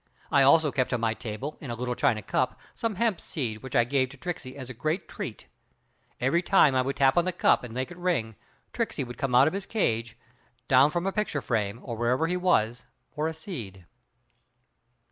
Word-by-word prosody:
I 140 - +5
also 150 +2 +5
kept 130 -2 0
on 125 - +1
my 115 -1 +1
table 115 +7 -6
in 140 - -7
a 120 - -3
little 125 +1 -2
china 110 -3 +1
cup, 130 +5 -1
some 230 -3 -2
hemp 220 -2 0
seed 115 -8 -4
which 130 0 -7
I 120 - +6
gave 130 +1 +1
to 140 - -13
Tricksey 140 -4 -6
as 130 -3 -7
a 130 - -7
great 155 - -2
treat. - - -7 0.7
Every 135 +8 +2
time 180 -6 +5
I 130 - +3
would 135 +2 -2
tap 135 +2 +3
on 175 - +1
the 185 - 0
cup 175 - +3
and 125 - -7
make 130 +7 -3
it 175 - -10
ring, 165 - -1 0.4
Tricksey - - -1
would 120 -1 -9
come 130 -3 0
out 125 - +7
of 155 - 0
his 195 0 -4
cage, 115 - -1 0.5
down 135 +2 +6
from 175 +3 -2
a 195 - +1
picture 210 -8 -1
frame, 110 -4 -1
or 120 - -5
wherever 120 +6 +1
he 175 +2 0
was, 125 -10 +1 0.3
for 150 +1 -1
a 160 - -3
seed. 115 - -8
130 Hz, 215 wpm, -27 LUFS, 120-165 Hz, 0.7 s, out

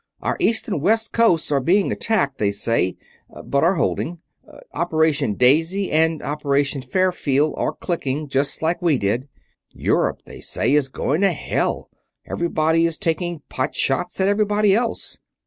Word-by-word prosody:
Our - - -1
east 230 -11 +2
and 190 -9 -2
west 225 +6 +1
coasts 185 -10 +2
are 140 - +3
both 130 - -7
being 195 +3 +3
attacked, 140 -12 0
they 105 - +2
say; 100 -2 0 0.5
but 140 +1 +1
are 175 +4 +3
holding. 175 0 -1 0.6
Operation 155 -8 +1
Daisy 165 - +2
and 160 0 +2
Operation 145 -1 -1
Fairfield 155 -1 +1
are - - -1
clicking, 150 -4 -3
just 140 +2 -1
like 165 +3 0
we 165 -5 +2
did. 120 +6 -1 0.4
Europe, - - -1
they - - -11
say, - - 0
is 145 -2 +2
going 150 +5 -1
to 200 -1 +4
hell - - -2 0.3
everybody 165 -1 +1
is 165 - -3
taking 175 -3 -2
pot 130 +3 -3
shots 135 +8 0
at 190 - +2
everybody 205 0 +2
else. 230 +2 -2
160 Hz, 155 wpm, -21 LUFS, 140-185 Hz, 0.6 s, to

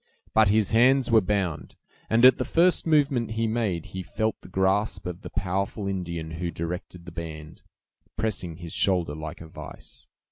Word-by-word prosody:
But 110 -2 +5
his 105 -1 +3
hands 125 +2 +4
were 110 -1 +6
bound; 95 -6 -2 0.3
and 115 +2 +5
at 130 - +7
the - - +1
first 170 +1 +2
movement 140 -8 +2
he 115 +1 0
made, 110 -7 -1
he 95 - -3
felt 110 +3 -2
the - - -13
grasp 95 +2 0
of 90 0 -5
the - - -8
powerful 100 +3 -2
Indian 85 -4 -4
who 85 +1 -3
directed 85 +1 -6
the 90 - -9
band, 80 -2 -8 0.6
pressing 100 -6 -2
his 85 -1 -8
shoulder 90 -6 +1
like 80 +2 -7
a 80 - -9
vise. 80 - -11
95 Hz, 175 wpm, -26 LUFS, 85-110 Hz, 0.6 s, at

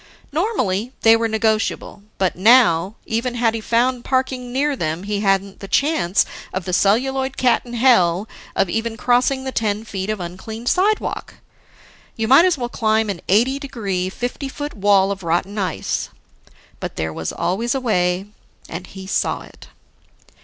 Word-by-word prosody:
Normally, 255 - -1
they 225 0 +7
were 230 0 +1
negotiable; 220 -2 -1 0.2
but 190 -2 0
now, 195 -3 +4
even 235 +2 -2
had 230 -2 +2
he 225 - -3
found 240 +2 +1
parking 260 -1 -1
near 280 +3 +1
them, 165 -4 -3
he 205 0 -2
hadn't 195 -1 0
the 195 - -8
chance 275 - +2 0.3
of 190 -2 -4
the 180 - -3
celluloid 265 +8 +1
cat 250 -2 +3
in 240 - -9
hell 220 -6 +3 0.3
of - - +2
even 225 +4 -2
crossing 250 +3 +2
the 265 - -3
ten 215 -3 -1
feet 195 -2 -4
of 215 -1 -2
uncleaned 190 +7 -7
sidewalk. 410 +3 0 0.8
You 225 -1 -1
might 270 +8 +7
as 360 -4 +2
well 245 -2 -2
climb 220 -3 +1
an 170 - -7
eighty 245 +8 +3
degree, 200 -10 -3
fifty 245 +6 -4
foot 290 +2 -6
wall 200 -1 +3
of 195 -1 -4
rotten 180 +5 -1
ice. 185 -5 -2 0.7
But - - -5
there 80 0 -3
was 80 - -4
always 195 +9 -1
a - - 0
way, 180 -6 0 0.4
and 180 +2 -7
he 190 -1 -10
saw 190 - -1
it. - - -14
220 Hz, 165 wpm, -20 LUFS, 190-255 Hz, 0.8 s, they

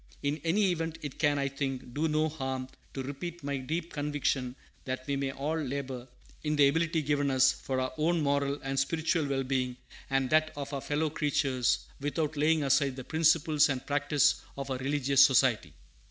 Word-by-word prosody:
In 145 +1 -1
any 190 +3 +2
event, 165 -1 -3
it 145 -3 -6
can, 145 -2 +3
I 140 0 0
think, 135 -3 -4
do 155 +4 0
no 155 0 +1
harm 130 -4 -4 0.3
to 135 - -3
repeat 155 +5 -6
my 140 0 -2
deep 160 +6 -4
conviction 145 -3 -1 0.3
that 130 0 -4
we 140 - -1
may 135 -1 -1
all 145 +4 -2
labor, 130 -3 -4 0.4
in 150 0 0
the 145 -1 +6
ability 160 +2 +1
given 145 0 +1
us, 130 0 +5
for 130 -1 -3
our 130 +3 -2
own 170 +2 +2
moral 140 0 0
and 135 0 -1
spiritual 160 +2 0
well 135 -1 0
being, 130 -1 -1 0.3
and 135 -1 +1
that 155 0 +4
of 140 0 -5
our 140 - -2
fellow 150 +2 -1
creatures, 140 -5 +1
without 150 +2 -2
laying 155 +1 +2
aside 140 -1 +2
the 130 - -7
principles 160 0 +3
and 135 -2 -2
practice 145 0 +2 0.2
of 140 0 -5
our 130 - -1
religious 140 0 +4
Society. 130 - +3
140 Hz, 185 wpm, -30 LUFS, 135-155 Hz, 0.4 s, the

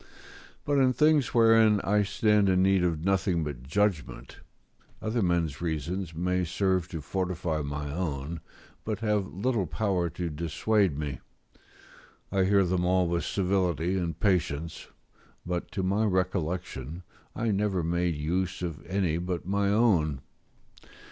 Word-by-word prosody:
But 145 -1 +2
in 130 -1 +4
things 150 -1 +3
wherein 115 -2 +5
I 105 +1 +2
stand 105 0 +2
in 95 0 +3
need 95 -1 +3
of 85 -2 -1
nothing 95 -3 +1
but 70 -5 -5
judgment, 85 +4 -2 0.6
other 110 +2 -1
men's 85 -5 0
reasons 85 +1 -3
may 90 +2 0
serve 90 0 0
to 85 -4 -6
fortify 90 -1 -2
my 70 0 -4
own, 80 -2 -3 0.4
but 110 -1 -3
have 105 -3 0
little 105 -1 -1
power 90 -2 0
to 85 +1 -4
dissuade 85 +3 0
me; 70 -4 -4 1.1
I 95 -1 +2
hear 100 0 +4
them 90 0 0
all 90 0 +2
with 85 0 -1
civility 90 -2 0
and 85 -3 -2
patience; 85 -5 -1 0.6
but, 90 0 -3
to 95 - -2
my 100 +4 +1
recollection, 90 - -2 0.3
I 115 -1 0
never 100 -3 0
made 85 0 0
use 90 +5 -2
of 85 -3 -5
any 90 -4 0
but 90 -1 -3
my 100 +1 +1
own. 90 - +2
90 Hz, 140 wpm, -28 LUFS, 85-100 Hz, 1.1 s, wherein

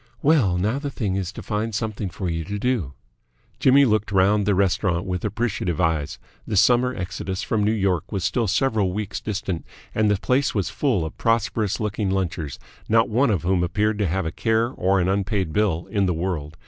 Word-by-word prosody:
"Well, 135 - +3
now 110 +9 0
the 145 0 -4
thing 105 -8 -2
is 95 -3 -2
to - - -8
find 110 +1 -2
something 110 -2 -3
for 95 +1 -5
you 80 -1 -2
to 105 +2 -4
do." 105 - -1 0.7
Jimmy 140 +2 +6
looked 110 -3 +1
round 100 +1 +3
the 100 - +3
restaurant 95 -2 +1
with 90 -2 -3
appreciative 105 -6 -2
eyes. 80 -4 0 0.3
The 105 - -1
summer 125 +4 +4
exodus 95 0 -4
from 110 -2 0
New 105 - +2
York 95 -4 0
was 100 -4 -2
still 115 +2 0
several 105 -3 +1
weeks 105 0 -3
distant, 100 -5 -3 0.3
and 110 -1 +2
the 105 - +2
place 130 +7 +1
was 95 -4 -1
full 115 - 0
of 80 - -8
prosperous 110 -2 0
looking 105 -2 -1
lunchers, 90 -7 -2 0.3
not 115 +1 +4
one 125 +5 +2
of 100 -7 0
whom 90 0 +2
appeared 105 +4 0
to 100 - +1
have 95 +2 -1
a 80 - -2
care 110 +5 +1
or 95 -5 +1
an 90 - +1
unpaid 95 -3 -1
bill 95 -6 +1
in 100 -3 +1
the 90 - 0
world. 80 -4 -3
100 Hz, 200 wpm, -23 LUFS, 90-110 Hz, 0.7 s, Jimmy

